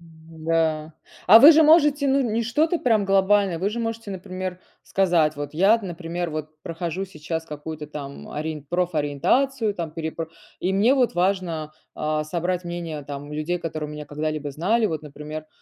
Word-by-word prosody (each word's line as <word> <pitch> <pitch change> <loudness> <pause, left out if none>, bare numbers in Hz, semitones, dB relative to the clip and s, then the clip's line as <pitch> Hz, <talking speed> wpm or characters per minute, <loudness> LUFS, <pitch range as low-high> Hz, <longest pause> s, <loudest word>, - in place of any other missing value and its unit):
Да. 160 -1 -2 0.3
А 210 +5 +10
вы 290 +7 +10
же 320 +1 +6
можете, 295 -3 +5
ну, 275 +1 +3
не 230 -2 0
что-то 310 +9 +1
прям 225 -7 +2
глобальное, 195 -2 +3
вы 195 +4 0
же 235 - -4
можете, 225 -2 -4
например, 185 -1 -5 0.2
сказать: 170 -6 +2
"Вот 145 0 -6
я, 195 +8 +5
например, 175 -2 -4
вот 155 0 -6
прохожу 170 +1 -4
сейчас 160 -2 -5
какую-то 150 0 -7
там 140 -2 -8
ориен 155 -1 -4
профориентацию 180 - 0
там, 170 -4 -4
переп 160 0 -5 0.4
и 185 +2 -1
мне 220 +8 +4
вот 250 -7 +2
важно, 175 -4 -1 0.2
а, 155 0 -1
собрать 175 +3 -2
мнение, 170 -3 -5
там, 145 +1 -7
людей, 155 +4 -2
которые 155 -2 -4
меня 150 0 -7
когда-либо 150 0 -3
знали. 210 +10 +1
Вот, 160 -4 -3
например, 150 +1 -8
170 Hz, 160 wpm, -24 LUFS, 155-200 Hz, 0.4 s, А